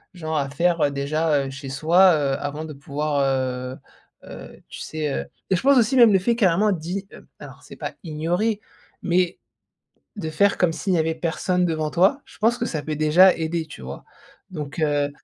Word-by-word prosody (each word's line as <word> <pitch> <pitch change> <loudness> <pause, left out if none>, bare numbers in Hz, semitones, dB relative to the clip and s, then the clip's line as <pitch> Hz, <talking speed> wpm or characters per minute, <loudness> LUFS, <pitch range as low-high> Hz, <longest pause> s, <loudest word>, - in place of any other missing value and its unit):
genre 160 -2 -4
à 140 -2 -1
faire, 170 +3 +1
heu, 145 - +3
déjà, 145 +1 0
heu, 135 - -6
chez 135 0 -8
soi, 170 +7 +4
heu, 140 -2 0
avant 145 +2 -4
de 155 - -8
pouvoir, 145 +1 -3
heu 130 -1 -2 0.5
heu, - - -11
tu - - -10
sais, 155 -2 -3
heu, - - -3 0.3
et - - +5
je - - -2
pense 275 0 +5
aussi, 240 +2 +3
même 235 -3 +7
le 195 - +5
fait 235 +5 +1
carrément 205 -1 +3
d'i 190 +3 -4
heu, - - -14
alors - - -12
c'est - - -13
pas - - -5
ignorer 175 +7 -1 0.4
mais 180 -1 0 0.8
de 160 -6 -4
faire 200 +6 +2
comme 175 -3 +2
s'il 190 +2 -1
n'y - - +2
avait 160 0 0
personne 180 +2 -1
devant 155 -2 -2
toi, 190 - +2
je - - -18
pense 230 +3 +2
que 240 - -2
ça 160 -10 -3
peut 155 +1 -4
déjà 160 +5 +5
aider, 160 0 -2
tu 145 - -11
vois. 65 +2 -8 0.5
Donc 150 -2 -7
heu 145 -2 +1
160 Hz, 205 wpm, -23 LUFS, 145-185 Hz, 0.8 s, même